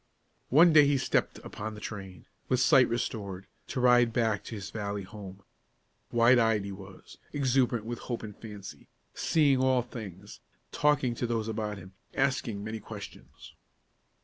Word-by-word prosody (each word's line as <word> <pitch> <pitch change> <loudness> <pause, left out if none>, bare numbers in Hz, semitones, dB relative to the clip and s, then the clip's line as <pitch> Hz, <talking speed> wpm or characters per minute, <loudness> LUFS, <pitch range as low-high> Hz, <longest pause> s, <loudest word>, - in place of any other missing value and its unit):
One 160 +5 +6
day 150 -2 +7
he 140 -1 +3
stepped - - 0
upon 110 +1 -6
the - - -9
train, 95 -3 -8 0.2
with 130 - +2
sight 130 -1 +5
restored, 100 -5 -3 0.2
to 135 - -3
ride 120 -1 +5
back 110 -3 0
to 115 - -6
his 100 -2 -7
valley 100 -2 -4
home. 95 -1 -10 0.7
Wide 120 +1 +5
eyed 110 -3 +2
he 100 - -5
was; 95 0 -12
exuberant 130 -5 +1
with 120 +1 -5
hope 120 -2 -5
and 105 -2 -8
fancy, 105 -3 -10 0.3
seeing 145 -5 +2
all 130 -1 +3
things, 105 -5 -9 0.3
talking 145 -4 +2
to 120 +1 -3
those 115 -2 -1
about 110 -2 -3
him, 95 0 -12 0.2
asking 125 -6 0
many 110 +1 -5
questions. - - -11
115 Hz, 155 wpm, -29 LUFS, 100-125 Hz, 0.7 s, day